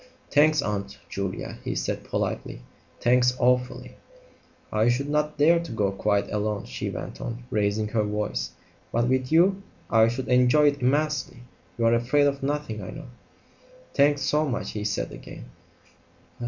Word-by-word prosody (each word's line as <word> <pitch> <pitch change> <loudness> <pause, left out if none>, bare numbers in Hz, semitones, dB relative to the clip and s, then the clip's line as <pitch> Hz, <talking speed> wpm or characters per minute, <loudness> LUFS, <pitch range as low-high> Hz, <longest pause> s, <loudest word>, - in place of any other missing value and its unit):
"Thanks, 150 0 +4
Aunt 100 -2 -3
Julia," 95 -1 -4
he - - -3
said - - -2
politely; - - -3 0.4
"thanks 125 +1 +3
awfully." 125 0 0 0.7
"I 110 +2 +3
should 130 +4 0
not 150 +1 0
dare 165 +4 +5
to 170 - -7
go 105 -3 0
quite 100 +1 0
alone," 105 -1 -2
she - - -4
went - - -7
on, 120 +1 -5
raising 105 -1 +1
her 110 0 +1
voice; 105 0 -2 0.4
"but 120 +1 +1
with 130 +1 0
you 190 +4 +4 0.3
I 110 -1 +6
should 120 +3 -3
enjoy 125 +4 +5
it 140 -1 -5
immensely. 140 -1 0 0.4
You're 115 0 +3
afraid 125 +5 +3
of 140 -1 0
nothing, 140 -6 -2
I 95 - -7
know." 150 -4 -9 0.8
"Thanks 145 0 +3
so 150 +1 +2
much," 135 -6 -3
he 105 - -4
said 105 -1 -2
again. - - -10
125 Hz, 155 wpm, -26 LUFS, 105-145 Hz, 0.8 s, I